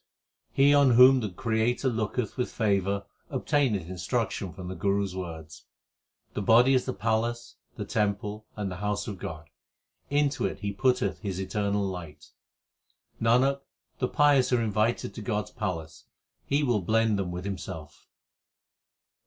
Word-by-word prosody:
He 140 +1 +5
on 140 -2 +6
whom 130 +2 +8
the 110 -4 -2
Creator 115 +5 0
looketh 110 -1 -2
with 125 - -2
favour 100 -2 0 0.2
obtaineth 120 - 0
instruction 95 +1 -2
from 90 0 -9
the 95 - -4
Guru 100 +3 0
s 95 -2 -4
words. 80 -4 -8 0.7
The - - -2
body 120 +6 +5
is 130 - +2
the 130 - -2
palace, 115 +2 -1 0.2
the - - -5
temple, 105 +1 -2
and 100 -3 -3
the 90 - -6
house 105 +2 -2
of 100 -4 -6
God; 75 -6 -7 0.6
into 145 -1 +1
it - - -7
He 100 -1 -2
putteth 125 +5 +1
His 95 -4 -4
eternal 100 +1 -1
light. 85 -6 -7 0.9
Nanak, 130 +5 +3 0.4
the 125 - +1
pious 145 -3 +3
are 125 - +3
invited 110 +2 0
to 115 - -7
God 105 -1 -1
s - - -15
palace; 80 -8 -5 0.4
He 145 +2 +2
will 120 -7 +1
blend 110 +2 +2
them 95 -2 -2
with 90 +1 -5
Himself. 85 -6 -7
105 Hz, 155 wpm, -27 LUFS, 95-125 Hz, 0.9 s, whom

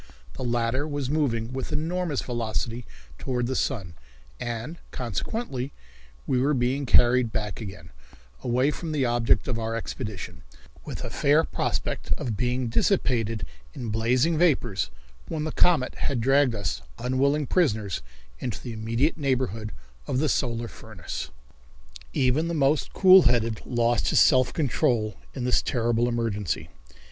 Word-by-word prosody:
The - - -6
latter 120 +4 0
was 145 -3 -3
moving 125 -6 0
with 130 +2 -4
enormous 160 0 -1
velocity 115 0 -3 0.3
toward 125 -2 -1
the 130 +2 -2
sun, 100 - -1 0.5
and, 120 +8 -4
consequently, 130 - -3 0.5
we 125 -1 +1
were 145 +2 +2
being 130 +2 0
carried 120 -1 +5
back 105 +1 -3
again, 95 -6 -8 0.5
away 125 - +2
from 160 0 -5
the 140 -4 +1
object 120 -3 +2
of 120 -3 -1
our 115 0 -2
expedition, 110 -3 -5 0.4
with - - -6
a - - -5
fair 150 +3 +3
prospect - - -2
of 115 -5 -3
being 125 +3 0
dissipated 115 - +1 0.3
in 120 - -4
blazing 125 +9 +2
vapors 120 - +2 0.4
when 155 - -3
the 155 - -2
comet 160 -7 +3
had 135 - -2
dragged 135 0 +3
us, 100 -7 -2 0.2
unwilling 135 +5 +1
prisoners, 110 - +1 0.4
into 120 - -4
the 120 - -6
immediate 115 +8 0
neighborhood 125 -6 -1 0.4
of - - 0
the 150 +2 +2
solar 120 -3 0
furnace. 110 -6 -7 0.8
Even 130 - +2
the 170 - -2
most 145 0 +2
cool 190 0 +8
headed 115 -5 +2
lost 120 -1 +1
his - - +4
self 130 -1 +5
control 120 - +1 0.2
in 130 - -3
this 125 0 +3
terrible 120 -1 +1
emergency. 110 -6 -2
125 Hz, 140 wpm, -26 LUFS, 115-140 Hz, 0.8 s, cool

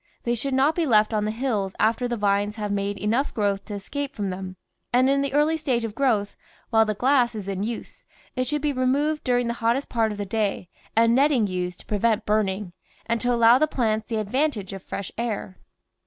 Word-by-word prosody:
They 240 - 0
should 260 +3 -1
not 275 +4 +3
be 330 -1 0
left 215 -2 +4
on 210 -1 +1
the - - -1
hills 215 -5 -2
after 230 +3 +2
the 240 -1 -2
vines 205 0 +1
have 210 -2 -3
made 200 0 -1
enough 225 +8 0
growth 200 -3 0
to 210 - -6
escape 280 +8 -4
from 200 -2 -2
them, 185 0 -6 0.4
and 255 +2 +4
in 275 +1 +3
the 280 -1 -1
early 300 +3 +2
stage 260 -6 -1
of 225 -2 -4
growth, 220 -5 0 0.4
while 220 -1 +5
the 215 -1 -2
glass 250 0 +2
is 205 -3 -6
in 195 -1 -3
use, 230 +3 -5 0.3
it 255 -1 -1
should 295 +2 -2
be 295 -1 +1
removed 280 +4 +1
during 245 -1 +1
the 235 - -1
hottest 235 +5 +1
part 225 -2 +1
of 210 - -6
the 205 - -3
day 200 -3 -2 0.3
and 230 +1 +4
netting 270 -3 +3
used 180 -2 -3
to - - -20
pre 210 - -2
vent 225 0 +1
burning, 205 -3 0 0.3
and 230 0 -1
to 245 - +1
allow 235 +1 +6
the 310 - +3
plants 220 -6 -1
the 230 - -3
advan 255 +9 +1
tage 200 -6 -7
of 195 - -7
fresh 200 +1 -6
air. 215 -5 -3
225 Hz, 230 wpm, -24 LUFS, 205-255 Hz, 0.4 s, allow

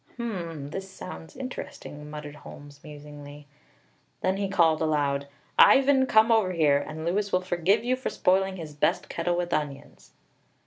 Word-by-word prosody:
"Hum, 170 - -5
this 190 +2 -6
sounds 185 -2 -10
interesting," 150 - -7
muttered 150 -1 -8
Holmes 145 0 -12
musingly. 145 -1 -11 0.8
Then 185 +1 +1
he 200 -1 -2
called 165 -5 +3
aloud: 145 -3 0 0.3
"Ivan, 270 -1 +6
come 220 0 +5
over 215 -5 +3
here, 150 -4 +3
and 155 +2 -6
Louis 200 +4 0
will 185 - +2
forgive 185 +4 +1
you 250 +1 +1
for 260 - -4
spoiling 190 +1 +1
his 155 -3 -8
best 145 - 0
kettle 175 +1 -1
with 175 -1 -2
onions!" 145 -3 -5
170 Hz, 150 wpm, -27 LUFS, 150-195 Hz, 0.8 s, Ivan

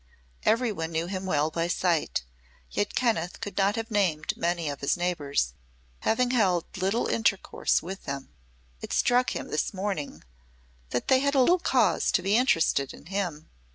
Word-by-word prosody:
Everyone 215 -8 +1
knew 165 +1 -1
him 190 +1 -4
well 155 -2 +1
by 165 +1 -1
sight, 175 - 0 0.5
yet 105 - -1
Kenneth 205 -8 0
could 205 - -6
not 200 +1 +2
have 225 0 -4
named 175 -8 +1
many 170 -1 -1
of 140 -1 -4
his 140 - +1
neighbors, 145 - -1 0.5
having 245 +2 +1
held 190 -9 +1
little 195 +4 0
intercourse 215 -4 +1
with 190 +3 -7
them. 140 -1 -5 0.5
It - - -5
struck 250 +1 +2
him, - - -5
this 155 - -1
morning, 185 - -3 0.7
that 125 - -2
they 260 - +5
had 280 +1 +1
little 340 +8 +5
cause - - +2
to - - +2
be 200 +2 +2
interested 165 - +2
in - - -16
him. 175 -6 -3
185 Hz, 160 wpm, -27 LUFS, 160-220 Hz, 0.7 s, they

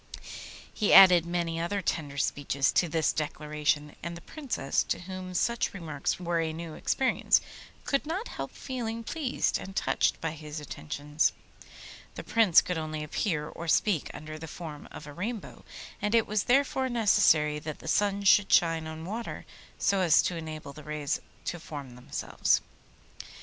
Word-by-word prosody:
He 210 - +2
added 180 -3 +9
many 170 -1 -1
other 175 +5 -1
tender 150 -6 -2
speeches 140 -1 +1
to 175 - +2
this 160 0 +1
declaration, 150 -1 -1
and 170 +1 -5
the - - -11
Princess, 270 - -2
to - - -2
whom 185 0 -7
such 235 +1 0
remarks 155 -6 -3
were 175 -1 0
a 160 -1 0
new 165 0 -7
experience, 260 +10 +2 0.5
could 275 +1 0
not 375 +9 -2
help - - -5
feeling 230 -3 -5
pleased 285 0 -1
and 195 - -9
touched - - +1
by 160 - -2
his 155 -1 -7
attentions. 145 - -1 0.8
The - - -6
Prince 220 -7 +5
could 180 -3 -2
only 155 -1 -4
appear 150 -1 -1
or 170 - -8
speak 170 0 +2
under 155 0 -8
the 160 - -7
form 155 -3 -8
of 150 - -9
a 145 - -9
Rainbow, 210 +7 -5 0.4
and 210 +2 +1
it 230 - +4
was 210 -1 0
therefore 265 0 +2
necessary 160 -10 +3
that 155 0 -6
the - - -12
sun 200 +3 +1
should 200 0 +5
shine 165 -2 +3
on 160 +1 -7
water 225 +5 -5 0.3
so 200 - +2
as 165 -4 +5
to 180 - -1
enable 155 -3 -7
the 150 - -11
rays 150 -1 -2 0.2
to 175 - -3
form 145 -5 -8
themselves. 125 - 0
165 Hz, 165 wpm, -29 LUFS, 150-205 Hz, 0.8 s, added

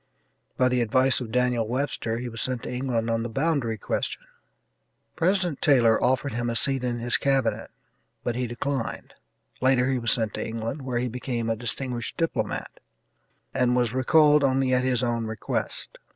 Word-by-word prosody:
By 125 - +4
the 125 -1 +1
advice 130 +4 +3
of 115 -3 -6
Daniel 125 -2 +1
Webster 120 -2 -2
he 125 +1 -4
was 115 -1 -6
sent 130 -3 -2
to - - -5
England 125 -3 -1
on 115 0 0
the 120 - -3
boundary 135 -3 0
question. - - -3 0.9
President 180 -3 0
Taylor 120 -6 +4
offered 130 +2 +1
him 120 0 -1
a 115 - -2
seat 135 +2 +3
in 120 -1 -1
his 120 0 +2
Cabinet, 135 -1 0 0.5
but 120 - -1
he 125 0 -1
declined 120 +1 -4 0.5
later 130 0 +3
he 130 - 0
was 115 -1 +1
sent 110 -4 +1
to - - -3
England, 115 +5 -4
where 130 -2 -3
he 125 +1 0
became 120 -1 -3
a - - 0
distinguished 120 +1 -4
diplomat, 165 -1 -2 0.7
and 125 -1 +2
was 120 -2 +1
recalled 150 +3 +4
only 130 -1 +2
at 125 0 +2
his 130 -1 +1
own 115 -2 -1
request. 110 -1 -3
125 Hz, 175 wpm, -25 LUFS, 115-135 Hz, 0.9 s, By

